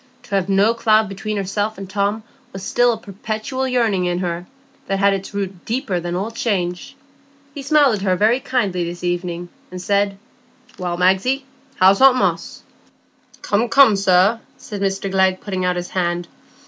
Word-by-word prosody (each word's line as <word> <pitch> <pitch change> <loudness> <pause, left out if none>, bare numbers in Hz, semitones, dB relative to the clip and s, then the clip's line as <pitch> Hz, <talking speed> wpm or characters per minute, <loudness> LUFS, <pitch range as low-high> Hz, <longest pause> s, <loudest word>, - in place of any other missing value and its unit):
To 245 - -19
have 195 -1 0
no 200 +4 +3
cloud 220 -2 +3
between 210 +2 -4
herself 205 +2 -2
and 195 0 -7
Tom 200 +3 -1 0.3
was 195 0 -7
still 245 +4 +2
a 225 - -2
perpetual 220 +5 -4
yearning 225 -8 +1
in 175 0 -1
her, 175 -1 -3 0.4
that 195 - 0
had 200 0 +3
its 195 0 -5
root 195 -3 -5
deeper 220 -6 -2
than 175 0 -4
all 200 +5 -3
change. 180 -6 -2 0.6
He 285 - -7
smiled 280 -4 +3
at - - -8
her 190 -2 +1
very 220 +7 +3
kindly 205 -10 -1
this 175 +1 -6
evening, 175 0 -3 0.2
and 180 - -7
said, 200 +1 0 0.6
"Well, 175 -1 -3
Magsie, 190 +10 +2 0.3
how's 190 +1 +4
aunt 265 -1 +7
Moss?" - - -2 0.8
"Come, 220 +4 0
come, 270 -4 +6
sir," 195 +3 +3 0.2
said 205 -2 -8
Mr 195 0 -1
Glegg 190 -1 +2
putting 185 -3 -3
out 180 0 +1
his 175 0 -4
hand. 175 -1 -1
195 Hz, 175 wpm, -20 LUFS, 180-220 Hz, 0.8 s, aunt